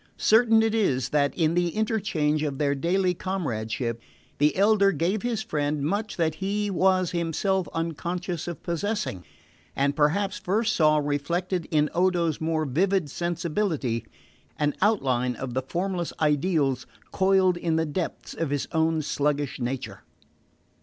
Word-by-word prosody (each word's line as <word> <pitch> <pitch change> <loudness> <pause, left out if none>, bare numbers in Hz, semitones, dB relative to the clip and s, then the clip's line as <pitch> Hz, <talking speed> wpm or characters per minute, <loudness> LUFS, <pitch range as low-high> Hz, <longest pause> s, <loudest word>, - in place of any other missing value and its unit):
Certain 225 0 +5
it 225 -1 +1
is 135 - +1
that, 145 -1 +2
in 160 -2 +2
the 175 0 +2
interchange 200 -9 0
of 145 -3 -2
their 140 -1 +1
daily 180 +6 +1
comradeship, 115 - -3 0.4
the 150 +1 +3
elder 200 0 +4
gave 190 +4 0
his 230 -3 -2
friend 150 -6 -1
much 205 +7 -2
that 160 -3 +1
he 205 +1 -1
was 185 -1 +2
himself 175 +3 0
unconscious 170 +1 -3
of 170 -4 -6
possessing, 170 - -2 0.5
and 140 +1 +1
perhaps 185 +7 +1
first 215 +4 0
saw 155 -2 +4
reflected 165 +5 -1
in 150 -1 +2
Odo's 175 -4 +1
more 160 -1 0
vivid 170 +2 +1
sensibility 170 - -1 0.5
an 150 -1 +1
outline 130 - +1
of 130 +1 -5
the 130 - 0
formless 175 +5 -3
ideals 145 -4 +1 0.2
coiled 190 -1 +3
in 170 -2 0
the 160 0 +1
depths 165 +3 -4
of 165 -3 -2
his 145 -1 -1
own 160 -1 +1
sluggish 145 -1 -1
nature. 125 +1 -4
165 Hz, 140 wpm, -26 LUFS, 145-190 Hz, 0.5 s, Certain